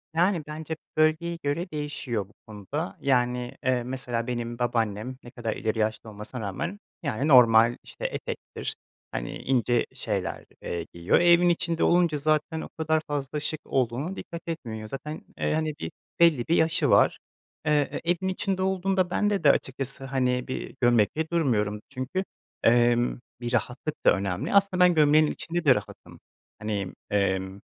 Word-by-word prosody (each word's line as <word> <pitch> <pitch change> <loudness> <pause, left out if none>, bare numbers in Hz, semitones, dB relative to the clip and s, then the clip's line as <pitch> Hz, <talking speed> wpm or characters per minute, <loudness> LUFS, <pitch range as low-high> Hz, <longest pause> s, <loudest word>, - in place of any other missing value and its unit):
Yani, 175 -1 +2
bence 155 +1 -5 0.2
bölgeye 155 +2 +2
göre 165 +6 -1
değişiyor 140 -8 -3
bu - - -23
konuda. 110 - -5
Yani, 125 -2 +1
eee, 125 -2 +2
mesela, 125 -2 -3
benim 120 -1 -3
babaannem 115 0 -1
ne 120 - -11
kadar 115 -3 -3
ileri 110 +1 -2
yaşta 110 0 -1
olmasına 105 +4 -7
rağmen, 170 - -4 0.2
yani, 140 0 -1
normal, 115 -4 +7
işte, - - -8
etektir, - - -5 0.4
hani, - - -4
ince 120 -2 +1
şeyler, - - -3 0.2
eee, 85 -1 -4
giyiyor. 85 +1 +2
E, 175 - +4
evin 175 +1 +6
içinde 170 -1 0
olunca 170 -3 +3
zaten 155 +2 0
o - - -7
kadar 160 0 +1
fazla 145 0 -2
şık 150 +1 -3
olduğuna 135 +8 -1
dikkat 170 0 -7
etmiyor. 115 -10 -5
Zaten, 150 +4 -6 0.2
eee, - - 0
hani, 155 0 0
bir 80 - -4 0.3
belli 160 -8 +4
bir 165 - +3
yaşı 160 0 +3
var. - - +4 0.5
Eee, 150 -2 +1
evin 175 +2 0
içinde 190 0 -1
olduğunda 190 -1 +1
bende 205 -2 +1
de 140 - +8
açıkçası, 135 0 -3
hani, 125 -2 0
bir 130 - -5
gömlekle 120 +6 +3
durmuyorum. 105 -10 +1
Çünkü, 130 +9 -3 0.4
emm, 120 +1 +3 0.2
bir 120 +1 -3
rahatlık 125 +5 -2
da - - +7
önemli. 100 - -2
Aslında 195 -2 +4
ben 180 -1 +6
gömleğin 155 0 +5
içinde 170 +2 -3
de 130 - +7
rahatım. - - -8 0.4
Hani, 105 -3 -3 0.2
emm 95 -1 0
135 Hz, 155 wpm, -26 LUFS, 115-160 Hz, 0.5 s, de